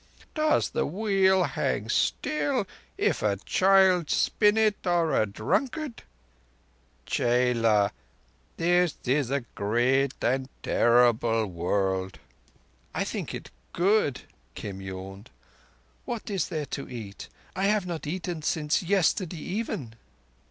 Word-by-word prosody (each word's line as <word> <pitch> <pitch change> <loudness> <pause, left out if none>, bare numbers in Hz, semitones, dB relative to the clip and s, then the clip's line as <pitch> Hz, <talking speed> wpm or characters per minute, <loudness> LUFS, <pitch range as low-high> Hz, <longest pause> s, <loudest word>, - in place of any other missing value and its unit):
Does 310 -1 +1
the - - 0
Wheel 190 0 +2
hang - - -1
still 280 -7 0 0.3
if - - +1
a 105 -2 +1
child 185 - +3
spin 210 0 +3
it—or 175 -6 +2
a 110 - +2
drunkard? 240 - -2 1.0
Chela, 115 -4 +2 0.7
this 175 -1 +2
is 130 0 +1
a 140 +1 0
great 125 +6 +1
and 130 +1 +1
a - - -35
terrible 115 -2 +3
world." 95 +1 -1 0.8
"I - - +1
think - - -4
it - - -9 0.2
good," 180 -6 +2 0.3
Kim 95 -1 -6
yawned. 95 +1 -8 0.8
"What 230 -3 -5
is 195 -3 0
there 155 -2 -3
to 140 - -6
eat? 110 -5 -8 0.3
I 190 +1 0
have 205 -1 +2
not 170 -4 -5
eaten 175 0 -4
since 150 0 0
yesterday 185 -1 +1
even." 160 - -4
150 Hz, 115 wpm, -27 LUFS, 115-190 Hz, 1.0 s, child